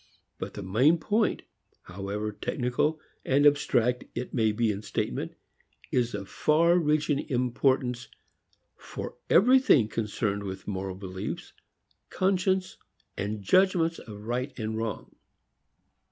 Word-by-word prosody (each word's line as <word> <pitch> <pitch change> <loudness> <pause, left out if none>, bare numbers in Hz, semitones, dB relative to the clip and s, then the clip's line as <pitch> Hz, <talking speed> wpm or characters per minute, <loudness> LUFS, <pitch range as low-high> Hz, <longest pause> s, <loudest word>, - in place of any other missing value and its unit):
But - - -6
the 100 - -6
main 125 - +4
point, 210 +6 0 0.4
however 100 +3 -4
technical 125 +8 -1 0.2
and 140 +2 +3
abstract 125 -4 +3
it 125 - -4
may 110 -4 +2
be 110 +1 +1
in 100 0 -5
statement, - - -3 0.6
is 120 -3 +1
of 100 -1 -6
far 170 - +3
reaching 150 -2 +1
importance 125 -1 +1 0.7
for - - -7
everything 245 - +5
concerned 105 -2 -2
with 95 -1 -7
moral 95 -2 -3
beliefs, 95 -1 -6 0.6
conscience 190 0 0 0.4
and 105 0 -4
judgments 175 - +3
of 105 -3 -10
right 125 +4 -3
and 110 -2 -3
wrong. 110 -1 -4
125 Hz, 115 wpm, -28 LUFS, 105-155 Hz, 0.7 s, everything